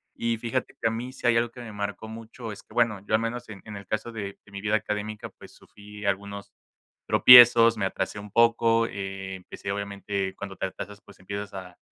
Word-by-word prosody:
y 115 -1 -1
fíjate 120 +2 -3
que - - +1
a - - +1
mí 120 +3 -5
si 130 - -10
hay 115 -1 +4
algo 120 0 +1
que 125 - -13
me 115 -2 -8
marcó 105 +1 -4
mucho 115 +1 -8
es 105 - -9
que, - - -19
bueno, 115 -5 +2
yo - - -3
al 110 - +1
menos 120 +2 -4
en 100 -3 -9
en 105 -2 -8
el 100 - -10
caso 110 +2 -3
de 100 -3 -6
de 100 - -19
mi 100 - -6
vida 105 +1 +1
académica, 105 0 -3
pues, - - -16
sufrí 105 0 -12
algunos 100 0 -3 0.6
tropiezos, 120 -2 +9
me 100 - 0
atrasé 95 - -3
un 105 0 -10
poco, 115 0 +4
eh, 95 -1 -6
empecé 95 +1 -7
obviamente 100 -1 -3
cuando 100 -1 -7
te 95 - -2
atrasas, 100 +2 -9
pues, 100 - -17
empiezas 100 +2 -6
a 90 -2 -9
105 Hz, 220 wpm, -26 LUFS, 100-115 Hz, 0.6 s, tropiezos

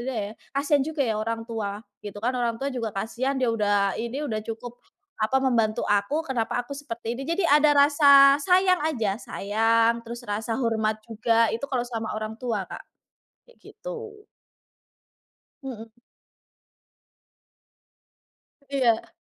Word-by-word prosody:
ya, 210 -2 -4 0.2
kasihan 285 0 +2
juga 310 0 -5
ya 220 -3 -1
orang 225 +1 -3
tua, 210 -3 -4 0.2
gitu 205 0 -7
kan. 245 +3 0
Orang 235 -2 -1
tua 275 - -1
juga 230 -3 -3
kasihan, 240 +7 -2
dia 255 - +2
udah 205 -3 +1
ini 235 +5 -4
udah 215 -1 -2
cukup, 230 +2 -7 0.4
apa, 220 +5 +1
membantu 230 -4 +1
aku 205 +10 +1
kenapa 245 -2 -1
aku 245 - -10
seperti 235 -4 -5
ini, - - -4
jadi 335 +4 0
ada 295 0 +5
rasa 280 -1 +7
sayang 365 +3 +3
aja, 225 -10 -1
sayang 225 +2 +1
terus 235 +1 -7
rasa 220 +2 -2
hormat 220 -3 0
juga 230 +1 +2
itu 230 +5 -3
kalau 260 -3 -1
sama 225 -3 -4
orang 215 0 -4
tua 230 -5 -2
Kak, - - -9 0.6
kayak - - -23
gitu. 455 -4 -9 1.4
Mhm. 230 -4 -8 2.8
Iya. 255 -5 +1
235 Hz, 135 wpm, -25 LUFS, 220-275 Hz, 2.8 s, rasa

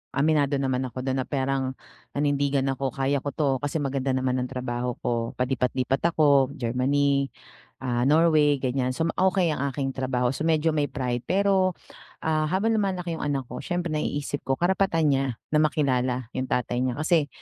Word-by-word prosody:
aminado 145 -1 +2
naman 130 -1 0
ako 125 +2 -6
do'n, 130 0 -1
na 130 - -3
parang 135 -1 -1
perang - - -25
nanindigan 140 -1 +1
ako, 135 -1 -3
"Kaya 135 +1 +1
ko 145 - -4
'to, 140 -4 +1
kasi 145 +4 -4
maganda 135 -3 0
naman 130 -1 0
ang 125 - -2
trabaho 125 -1 -3
ko", 115 -1 -1
palipat-lipat 125 +1 0 0.2
ako 140 -4 +5
Germany, 140 +3 +1 0.6
ah, 120 0 +1
Norway, 155 -1 +4
ganyan. 130 0 -1
So, 160 - 0
ma - - 0
okay 185 -2 +3
ang 140 -2 -1
aking 135 -1 -2
trabaho. 125 -1 0
So, 155 - -4
medyo 160 0 +2
may 145 -1 +1
pride, 125 -3 -2
pero, 190 -2 +2 0.5
ah, 155 -1 +1
habang 195 +7 +1
lumalaki 185 -5 -1
yung - - -4
anak 140 -2 -1
ko, 125 - -5
siyempre 175 +1 -2
naiisip 145 -1 -2
ko 135 - +2
karapatan 175 -4 +2
niya, 135 0 +2 0.3
na 150 - +3
makilala 130 -5 +1
yung 130 0 -2
tatay 125 0 0
niya. 125 -2 -1
Kasi, 155 -2 +2
140 Hz, 180 wpm, -26 LUFS, 130-155 Hz, 0.6 s, ako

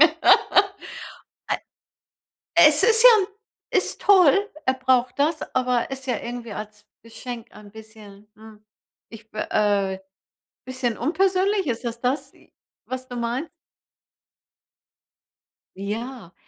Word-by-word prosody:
äh. 320 +1 +7 2.5
Es 310 -3 +6
ist 455 0 +4
ja 440 -6 +7 0.4
ist - - 0
toll, 395 0 +5 0.2
er 260 - +2
braucht 255 -1 +1
das, 300 +4 0
aber 250 -1 0
ist 265 0 -7
ja 245 -4 0
irgendwie 235 -2 -7
als 210 0 -9 0.2
Geschenk 230 0 -8
ein 210 -1 -14
bisschen, 215 -2 -14
hm, 215 -1 -16 0.5
ich 225 -1 -14
be 215 - -5
äh, 200 -2 +1 0.7
bisschen 255 -3 -3
unpersönlich. 385 +3 +1
Ist 235 0 -3
es 235 0 -4
das, 260 +3 -2 0.5
was 255 0 -6
du 245 - -8
meinst? 240 +7 -3 2.3
Ja, 215 0 -6
245 Hz, 110 wpm, -23 LUFS, 220-295 Hz, 2.5 s, äh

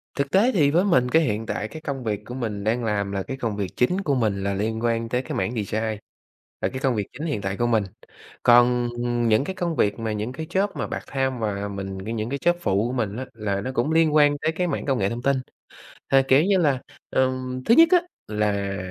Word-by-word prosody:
Thực 140 -2 -2
tế 220 +7 +4
thì 145 - +3
với 175 +4 +3
mình, 130 -11 +3
cái, 160 +4 +4
hiện 110 -5 -1
tại 105 - -3
cái 155 +7 -9
công 135 -4 -4
việc 105 -2 -2
của 120 - -8
mình 110 -5 -3
đang 115 +3 0
làm 100 -2 -1
là 95 -1 -2
cái 135 - -6
công 115 -5 -2
việc 100 -2 -1
chính 180 +10 +2
của 145 -7 0
mình 105 -5 0
là 100 0 0
liên 110 +3 -2
quan 115 -1 0
tới 125 +1 0
cái 130 - -6
mảng 95 +6 -1
design, 110 +1 -2 0.6
là - - +1
cái 130 - -5
công 130 -3 +2
việc 105 -2 -2
chính 155 +5 -5
hiện 110 -9 -2
tại 95 0 -3
của 120 - +1
mình. 110 -3 +2 0.6
Còn 120 0 +5 0.4
những 110 +5 +4
cái 190 +5 -5
công 175 -3 -2
việc 105 -2 +1
mà 110 -1 -2
những 105 +4 -3
cái 160 +4 -5
job 190 +4 +1
mà 145 - -3
part-time 130 -2 -2
và 105 -2 -2
mình 95 -1 -5
có 110 - -4
những 110 0 -3
cái 140 0 -3
job 175 - +5
phụ 100 - +1
của 125 - -4
mình 110 -3 -2
á, 130 - -4
là 100 -3 -2
nó 130 - -4
cũng 120 +6 +1
liên 160 -1 +3
quan 145 -1 +5
tới 160 - 0
cái 180 +2 -1
mảng 145 - -3
công 135 -2 +1
nghệ 100 0 +1
thông 120 +1 -4
tin. 140 0 +2 0.8
Th - - +6
kiểu 135 +4 +5
như 195 0 +3
là, 140 -6 +2 0.3
ừm, 130 0 -1
thứ 230 - +5
nhất 330 +3 +7
á, 355 - +7 0.3
là 100 -2 -1
120 Hz, 255 wpm, -24 LUFS, 105-140 Hz, 0.8 s, nhất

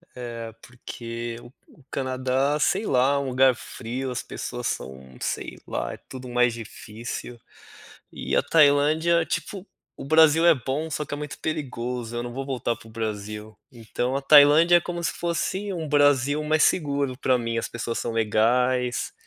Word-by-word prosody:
É 115 -2 -7
porque 115 -1 -7
o 120 - -14 0.2
o 145 - -21
Canadá, 130 +2 0
sei 195 +7 +1
lá, 135 0 +2
um 140 - -3
lugar 130 +1 +4
frio, 125 +2 -6
as 125 - -4
pessoas 120 -1 -5
são, 65 -1 -6
sei - - -4
lá, - - -3
é - - -9
tudo 130 -1 -8
mais 125 -1 +2
difícil, 115 +1 -8 0.7
e 65 0 -3
a - - +4
Tailândia 160 +2 +3
tipo, 185 +2 -4 0.3
o - - -8
Brasil 160 +2 +5
é 170 - +7
bom 140 +4 -3
só 150 -1 -2
que - - -13
é - - -1
muito 150 0 -6
perigoso, 125 -6 -4
eu 120 - -2
não 120 0 -6
vou 135 +2 -5
voltar 125 -3 -2
para - - -16
o - - -13
Brasil, 105 -1 -5
então 120 +2 -3
a 140 - -3
Tailândia 150 +4 +7
é - - +4
como 175 0 -5
se - - -1
fosse 185 +4 -2
um 165 -4 -4
Brasil 145 0 +3
mais 155 +1 +2
seguro 140 -6 +1
para 130 -2 +2
mim, 115 -1 -2
as - - -3
pessoas 115 0 -4
são 120 - -3
legais, 120 +3 +1
130 Hz, 175 wpm, -25 LUFS, 115-150 Hz, 0.7 s, é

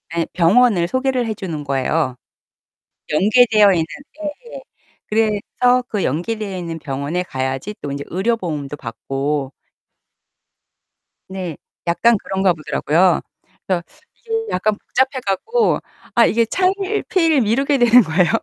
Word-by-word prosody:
예 170 - +1
병원을 185 +1 +4
소개를 260 +3 0
해 220 - -2
주는 170 -8 -5
거예요. 135 0 0 1.0
연계되어 215 +2 +5
있는 165 -3 +1 0.3
예예 315 +11 -7 0.5
그래서 225 +3 +1
그 210 -5 -2
연계되어 195 - -2
있는 165 -2 -5
병원에 145 +4 -3
가야지 130 +6 -4
또 145 - -5
인제 140 0 -5
의료 195 +7 0
보험도 150 -8 -5
받고 135 +2 -3 1.8
네. 185 -4 -5 0.3
약간 230 +7 +4
그런가 190 -1 +1
보더라고요. 165 +2 +1 0.5
그래서 185 -2 +1 0.3
이게 460 - -14 0.2
약간 210 +3 +1
복잡해 265 +1 0
갖고 440 - +1 0.4
아 235 - +6
이게 230 +1 +2
차일피일 370 - +1
미루게 270 +6 +1
되는 245 0 +7
거예요. 175 -2 +2
195 Hz, 275 characters per minute, -19 LUFS, 160-245 Hz, 1.8 s, 되는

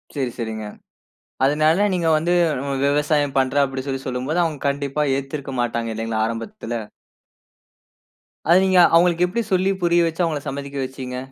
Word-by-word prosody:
சரி, 130 -4 -1
சரிங்க. 110 -2 -4 0.8
அதனால 155 +7 +3
நீங்க 170 -2 0
வந்து 165 +3 0 0.5
விவசாயம் 145 0 +1
பண்றேன் 135 +2 +2
அப்படின்னு 135 0 -5
சொல்லி 135 -1 -3
சொல்லும்போது, 130 +6 -2
அவங்க 155 -4 -3
கண்டிப்பா 140 +1 -1
ஏத்திருக்க 135 0 -5
மாட்டாங்க 115 -1 -2
இல்லைங்களா 110 0 -1
ஆரம்பத்தில? 115 - -5 1.7
அதை 170 - +6
நீங்க, 185 -1 +4 0.2
அவங்களுக்கு 175 +1 +4
எப்படி 235 +6 -2
சொல்லி 185 +1 +2
புரிய 170 0 +4
வச்சு 165 +2 -1
அவங்கள 155 -3 -2
சம்மதிக்க 140 0 -6
வச்சீங்க? 130 -1 -7
140 Hz, 140 wpm, -21 LUFS, 130-165 Hz, 1.7 s, அதை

